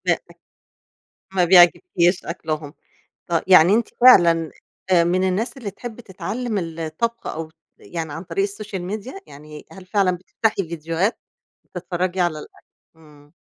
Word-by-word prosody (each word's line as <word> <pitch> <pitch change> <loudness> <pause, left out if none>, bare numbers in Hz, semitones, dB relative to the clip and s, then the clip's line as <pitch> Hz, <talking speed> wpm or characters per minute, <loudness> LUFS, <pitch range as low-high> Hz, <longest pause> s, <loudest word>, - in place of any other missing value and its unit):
ب - - +3 1.2
ما 180 -2 +3
بيعجبكش 175 - +4
أكلهم. 155 -1 -5 0.5
ط 170 - -10
يعني 185 0 +7
أنت 230 +1 +1
فعلًا 170 -10 +6 0.4
من 175 +1 +3
الناس 225 +8 -2
اللي 220 -6 -6
تحبي 240 +1 -9
تتعلم 210 +4 -4 0.2
الطبخ 165 +9 -3
أو 160 0 -5 0.3
يعني 160 -3 -6
عن 160 - -6
طريق 180 +2 -2
السوشيال 200 -2 -6
ميديا 215 - -6
يعني 150 +1 -12
هل 190 -1 -13
فعلًا 200 -1 +2
بتفتحي 190 0 -2
فيديوهات 165 +5 -2 0.5
بتتفرجي 180 +1 -3
على 175 -3 0
الأكل؟ - - -14 0.3
امم. 150 -2 -20
180 Hz, 130 wpm, -21 LUFS, 165-205 Hz, 1.2 s, يعني